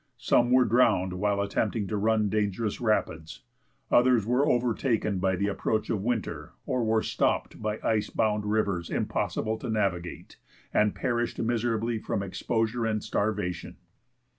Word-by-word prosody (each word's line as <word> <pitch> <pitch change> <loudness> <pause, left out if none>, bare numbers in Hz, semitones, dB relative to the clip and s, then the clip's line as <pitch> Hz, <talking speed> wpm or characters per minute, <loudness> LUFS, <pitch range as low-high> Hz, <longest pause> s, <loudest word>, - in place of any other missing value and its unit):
Some 120 0 +2
were 125 0 +5
drowned 100 -6 +3
while 100 +2 0
attempting 105 +1 -1
to 110 - -2
run 110 +1 +2
dangerous 105 +1 -1
rapids. 80 -8 -1 0.5
Others 120 -3 +4
were 125 +5 +2
overtaken 115 -4 0
by 95 0 +1
the 100 - -1
approach 105 +1 -1
of 105 - -1
winter, 100 -9 -3
or 130 -4 0
were 110 0 +2
stopped - - -1
by 105 0 -2
ice 110 -2 +1
bound 105 -1 0
rivers 100 -5 0
impossible 110 0 -2
to 125 - -5
navigate, 95 -6 -2 0.4
and 105 -1 +2
perished 120 -1 -1
miserably 115 -1 0
from 100 - -2
exposure 115 +4 -1
and 110 -1 -1
starvation. 100 -4 -2
110 Hz, 140 wpm, -27 LUFS, 100-115 Hz, 0.5 s, were